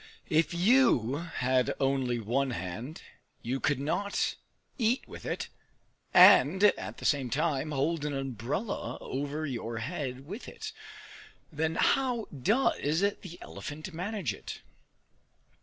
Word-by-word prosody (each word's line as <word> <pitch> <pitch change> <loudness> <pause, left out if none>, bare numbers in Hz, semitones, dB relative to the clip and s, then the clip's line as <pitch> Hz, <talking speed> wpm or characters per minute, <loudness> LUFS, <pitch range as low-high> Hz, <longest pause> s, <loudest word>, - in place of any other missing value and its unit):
If 160 +1 +3
you 175 - +4
had 130 -6 0
only 135 -3 +1
one 125 +5 0
hand, 115 - -5 0.4
you 130 +3 -2
could 145 -1 +1
not 200 +8 0 0.5
eat 235 +2 +1
with - - -9
it - - -2 0.6
and 185 -1 +7
at 210 - +2
the - - -8
same 140 -4 +2
time 150 +1 0
hold 150 +2 0
an 150 -1 -2
umbrella 135 - -3
over 145 +3 -3
your 120 -4 -4
head 130 0 -4
with 200 - -7
it! - - -7 0.8
Then 160 +1 -1
how 250 -5 +2
does 160 - +1
the 200 -3 -2
elephant 155 +5 -7
manage 180 - -2
it? - - -8
150 Hz, 125 wpm, -30 LUFS, 130-185 Hz, 0.8 s, and